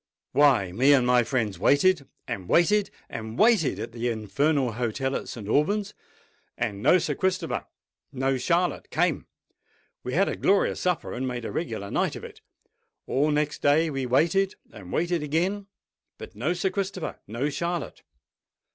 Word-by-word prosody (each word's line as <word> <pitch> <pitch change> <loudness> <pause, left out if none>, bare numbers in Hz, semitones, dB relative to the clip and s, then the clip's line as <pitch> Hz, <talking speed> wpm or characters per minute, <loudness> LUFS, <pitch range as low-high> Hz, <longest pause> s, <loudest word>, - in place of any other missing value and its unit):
"Why, 130 -10 +4
me 130 +9 +4
and 130 -3 +4
my 125 -1 +4
friends 110 -7 -2
waited—and 140 - +1
waited—and 170 - 0
waited 210 - +4
at 115 +2 -5
the 120 +1 -3
infernal 120 +5 0
hotel 125 +4 -2
at - - -4
St. 110 -4 -7
Alban's; 200 - +1 0.6
and 100 0 -3
no 180 - +5
Sir 155 -4 -1
Christopher—no 135 -6 -3
Charlotte 175 +6 0
came. - - 0 0.8
We 125 - -4
had 195 +3 +3
a - - -2
glorious 200 0 +2
supper, 180 -2 -1
and 130 +2 -3
made 120 -2 -4
a - - -4
regular 110 -11 -4
night - - 0
of - - -8
it. - - -11 0.6
All 145 +3 +1
next 150 0 -1
day 155 +3 +3
we 135 -2 -2
waited—and 135 - 0
waited 170 - 0
again; 180 +7 -1 0.5
but - - -10
no 135 +11 0
Sir 180 +2 -1
Christopher—no 185 - -3
Charlotte. 170 +2 -3
145 Hz, 145 wpm, -26 LUFS, 120-175 Hz, 0.8 s, no